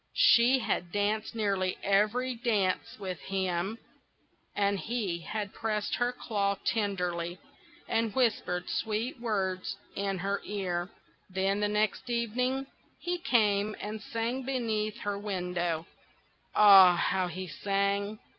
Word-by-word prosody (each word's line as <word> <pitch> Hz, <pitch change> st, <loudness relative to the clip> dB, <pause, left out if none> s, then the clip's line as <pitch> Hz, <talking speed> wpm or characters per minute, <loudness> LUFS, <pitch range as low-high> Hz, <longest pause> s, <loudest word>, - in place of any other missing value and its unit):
She 240 Hz, +3 st, +5 dB
had 180 Hz, -7 st, -2 dB
danced 210 Hz, +3 st, -1 dB
nearly 195 Hz, -4 st, 0 dB
every 215 Hz, +6 st, +2 dB
dance 215 Hz, -6 st, 0 dB
with 185 Hz, -4 st, -5 dB
him, 190 Hz, +2 st, -2 dB, 0.8 s
and 200 Hz, -1 st, +1 dB
he 210 Hz, -7 st, -2 dB
had 205 Hz, +3 st, -4 dB
pressed 215 Hz, -2 st, -2 dB
her 245 Hz, 0 st, +1 dB
claw 200 Hz, -5 st, -1 dB
tenderly, 180 Hz, -5 st, -1 dB, 0.5 s
and 225 Hz, -1 st, +1 dB
whispered 205 Hz, -8 st, +1 dB
sweet 225 Hz, +4 st, -2 dB
words 195 Hz, -5 st, -1 dB, 0.2 s
in 195 Hz, -1 st, -1 dB
her 200 Hz, +2 st, -2 dB
ear. 180 Hz, -3 st, -2 dB, 0.4 s
Then, 190 Hz, +2 st, 0 dB
the 210 Hz, -, +2 dB
next 215 Hz, +4 st, 0 dB
evening, 250 Hz, +3 st, 0 dB, 0.3 s
he 350 Hz, 0 st, -2 dB
came 210 Hz, -6 st, +2 dB
and 210 Hz, +1 st, -5 dB
sang 230 Hz, +4 st, -2 dB
beneath 225 Hz, -5 st, -1 dB
her 205 Hz, -1 st, -2 dB
window; 180 Hz, -5 st, -2 dB, 0.7 s
ah, 195 Hz, -4 st, +9 dB
how 185 Hz, +1 st, +1 dB
he 185 Hz, +2 st, -5 dB
sang! 200 Hz, +3 st, -1 dB
205 Hz, 120 wpm, -30 LUFS, 190-225 Hz, 0.8 s, ah